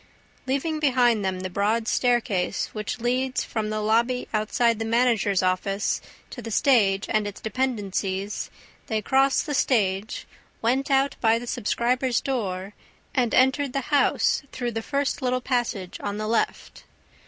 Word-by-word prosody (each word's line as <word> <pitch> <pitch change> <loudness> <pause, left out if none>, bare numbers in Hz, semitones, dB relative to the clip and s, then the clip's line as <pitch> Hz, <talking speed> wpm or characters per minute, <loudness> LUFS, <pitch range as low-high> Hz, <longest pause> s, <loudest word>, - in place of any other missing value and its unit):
Leaving 295 +4 -1
behind 245 -7 +3
them 190 -1 -2
the 185 - -3
broad 215 +4 0
staircase 240 -9 +1
which 215 +2 -4
leads 255 +2 0
from 215 -1 -3
the 215 0 -2
lobby 235 +4 +1
outside 225 +1 +1
the - - -1
managers' 225 -4 +2
offices 185 +2 0 0.3
to 245 - -7
the 230 - -6
stage 205 -5 +3
and 215 -2 +1
its 205 - -7
dependencies, 205 -5 -2 0.4
they 220 -2 0
crossed 270 +4 +2
the 295 - -3
stage, 210 -7 0 0.3
went 260 +5 0
out 275 0 +2
by 225 -1 +4
the 240 - -6
subscribers' 245 +2 0
door 200 -7 -3 0.4
and 245 -3 +1
entered 265 +1 +3
the 275 +2 -3
house 285 - +3
through 245 -2 -3
the 225 0 -3
first 280 +4 -1
little 255 0 +1
passage 240 -8 -2
on 205 0 -3
the 215 0 -3
left. 230 - -2
230 Hz, 150 wpm, -25 LUFS, 205-255 Hz, 0.4 s, by